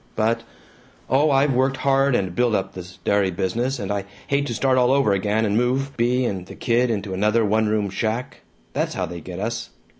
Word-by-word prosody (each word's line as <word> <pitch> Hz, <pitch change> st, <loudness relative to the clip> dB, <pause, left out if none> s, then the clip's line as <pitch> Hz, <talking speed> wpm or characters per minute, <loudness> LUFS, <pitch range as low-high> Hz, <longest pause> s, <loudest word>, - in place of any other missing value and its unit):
But 110 Hz, +1 st, +1 dB, 0.7 s
oh, 145 Hz, +4 st, +4 dB
I've 135 Hz, 0 st, +3 dB
worked 130 Hz, +2 st, +1 dB
hard, 135 Hz, 0 st, +2 dB
and 95 Hz, -5 st, -1 dB
built 120 Hz, +3 st, +2 dB
up 95 Hz, -1 st, -2 dB
this 90 Hz, -1 st, -9 dB
dairy 100 Hz, -2 st, +3 dB
business, 105 Hz, +9 st, -1 dB
and 100 Hz, -1 st, -4 dB
I 100 Hz, -1 st, -2 dB, 0.2 s
hate 140 Hz, 0 st, 0 dB
to 120 Hz, -, -3 dB
start 130 Hz, +2 st, +2 dB
all 125 Hz, 0 st, +4 dB
over 135 Hz, -6 st, +3 dB
again, 105 Hz, +3 st, +1 dB
and 105 Hz, -1 st, 0 dB
move 130 Hz, +4 st, 0 dB
Bea 125 Hz, +2 st, +1 dB
and 95 Hz, -5 st, -3 dB
the -, -, -10 dB
kid 120 Hz, +1 st, +1 dB
into 100 Hz, -3 st, -2 dB
another 105 Hz, +4 st, +2 dB
one 110 Hz, +1 st, +2 dB
room 105 Hz, -2 st, 0 dB
shack. 110 Hz, +5 st, -3 dB, 0.3 s
That's -, -, -1 dB
how -, -, -1 dB
they 85 Hz, 0 st, -7 dB
get 90 Hz, +2 st, -8 dB
us! 115 Hz, +3 st, -3 dB
115 Hz, 210 wpm, -22 LUFS, 100-130 Hz, 0.7 s, oh